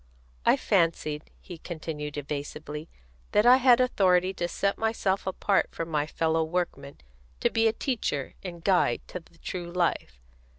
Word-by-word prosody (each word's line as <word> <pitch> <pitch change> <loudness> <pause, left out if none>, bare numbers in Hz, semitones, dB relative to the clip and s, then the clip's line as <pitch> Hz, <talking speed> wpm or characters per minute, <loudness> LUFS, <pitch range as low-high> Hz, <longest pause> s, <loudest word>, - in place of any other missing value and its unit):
"I - - +6
fancied," 155 -2 0
he 175 -3 -10
continued 150 -3 -6
evasively, 150 +2 -5 0.4
"that 210 +2 +4
I 250 +1 +8
had 250 -2 +5
authority 190 -7 +3
to 175 -2 -2
set 200 +3 -1
myself 205 -4 0
apart 195 +1 +1
from 165 0 -5
my 150 -2 0
fellow 160 0 +1
workmen, 160 -4 -3 0.4
to - - +1
be 225 0 +3
a - - +4
teacher 220 - -2
and 170 -3 -7
guide 180 -11 +2
to 180 - -5
the 165 0 -23
true 175 -1 -6
life. 170 - -1
175 Hz, 155 wpm, -27 LUFS, 150-195 Hz, 0.4 s, I